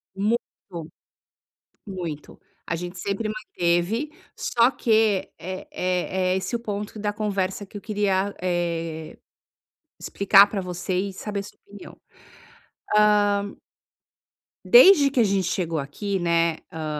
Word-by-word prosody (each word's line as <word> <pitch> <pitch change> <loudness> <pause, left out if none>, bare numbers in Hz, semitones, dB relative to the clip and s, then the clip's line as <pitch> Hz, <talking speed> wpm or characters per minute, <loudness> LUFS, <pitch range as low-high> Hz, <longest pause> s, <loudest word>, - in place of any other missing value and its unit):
Muito. 215 +5 +1 1.5
Muito 175 -7 -7 0.3
a 170 - -2
gente 180 +1 -7
sempre 200 +4 -3
manteve. 215 - -1 0.3
Só 240 +2 +2
que 220 -5 +1
é 185 +1 -7
é 185 0 -1
é - - +1
esse 215 +5 -3
o - - -1
ponto 210 -1 -5
da 210 0 -2
conversa 200 -2 -2
que 205 - -10
eu - - -9
queria, 200 -2 0
eh, 165 -3 -3 0.8
explicar 200 0 +5
pra 200 -1 -4
você 180 +1 -4
e 195 0 -3
saber 205 +1 -4
sua 205 - -13
opinião. 205 -1 -13 1.4
hã 200 0 -7 1.1
desde 380 - +7
que 270 - 0
a 235 - +6
gente 195 -2 +1
chegou 170 -3 -2
aqui, 190 +8 -3
né, 170 -1 +1
hã, 160 -1 -5
195 Hz, 125 wpm, -24 LUFS, 175-210 Hz, 1.5 s, desde